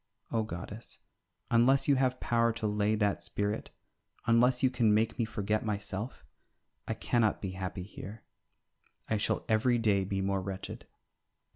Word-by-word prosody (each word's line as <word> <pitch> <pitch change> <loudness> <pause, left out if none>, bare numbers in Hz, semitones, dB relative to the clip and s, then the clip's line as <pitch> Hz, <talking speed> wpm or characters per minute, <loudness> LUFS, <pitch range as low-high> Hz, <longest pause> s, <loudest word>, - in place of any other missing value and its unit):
O 115 - +2
goddess, 105 +2 -4 0.5
unless 125 +4 +4
you 145 - +6
have 130 -1 +1
power 115 0 +2
to 115 -1 -4
lay 105 0 +2
that 105 -2 +1
spirit, 105 +1 -2 0.6
unless 125 +2 +4
you 130 - +4
can 115 -4 +3
make 110 +3 +1
me 115 - +2
forget 105 0 -1
myself, 105 +1 -4 0.6
I 110 - -1
cannot 115 -1 +1
be 95 - -4
happy 95 0 -4
here, 105 +2 -9 0.8
I 110 - +1
shall 105 - -1
every 120 +2 +3
day 105 -4 +2
be 95 +1 -2
more 95 0 0
wretched. 95 0 -6
110 Hz, 150 wpm, -31 LUFS, 100-115 Hz, 0.8 s, you